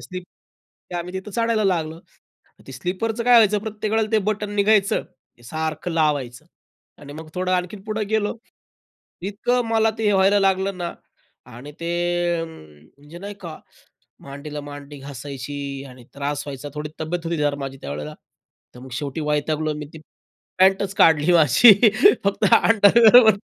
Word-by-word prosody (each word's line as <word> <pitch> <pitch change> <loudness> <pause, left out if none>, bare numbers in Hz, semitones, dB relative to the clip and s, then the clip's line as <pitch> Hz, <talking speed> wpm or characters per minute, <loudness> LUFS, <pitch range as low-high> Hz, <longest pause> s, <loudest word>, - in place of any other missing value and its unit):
Sleep 180 -1 -8 0.7
ते - - -7
आम्ही 175 +1 -5
तिथं 190 +2 -6
चढायला 230 0 0
लागलो. 165 -3 -1 0.7
ते 135 - -10
स्लीपरचं 205 - -3
काय 245 - +5
व्हायचं 215 -3 +5
प्रत्येक 215 0 -5
वेळेला 220 0 +1
ते 220 - +4
बटन 210 -1 -2
निघायचं. 205 -1 +2 0.4
ते - - -21
सारखं 155 +5 -4
लावायचं 150 -3 -1 0.6
आणि 145 0 -10
मग 155 +1 -10
थोडं 185 0 -1
आणखीन 180 +2 -2
पुढे 215 0 -2
गेलो. 215 -1 0 0.9
इतकं 230 +6 -1
मला 225 0 +3
ते 220 - -2
हे - - +4
व्हायला 195 +1 +4
लागलं 195 0 0
ना 175 -1 -4 0.6
आणि 135 +5 -10
ते 170 0 -4 0.5
अ, 165 - -3
म्हणजे 145 - -15
नाही 200 +2 -7
का, 165 -4 -8 0.7
मांडीला 145 +2 -7
मांडी 145 0 -10
घासायची 140 +1 -7 0.3
आणि 125 -1 -14
त्रास 140 +1 -3
व्हायचा 140 0 -7
थोडी 150 0 -5
तब्येत 165 +2 -4
होती 150 -4 -1
माझी 135 0 -6
त्यावेळेला. 75 +2 -6 0.6
तर - - -13
मग 130 +1 -11
शेवटी 145 +1 -5
वैतागलो 155 +1 -1
मी - - -7
ती 160 - -10 0.6
पॅन्टच 190 +1 +3
काढली 160 0 +4
माझी, 170 - +7 0.5
फक्त 200 0 0
अंडरवेअर 225 +2 +7
वर 220 -3 +5
170 Hz, 155 wpm, -22 LUFS, 145-205 Hz, 0.9 s, माझी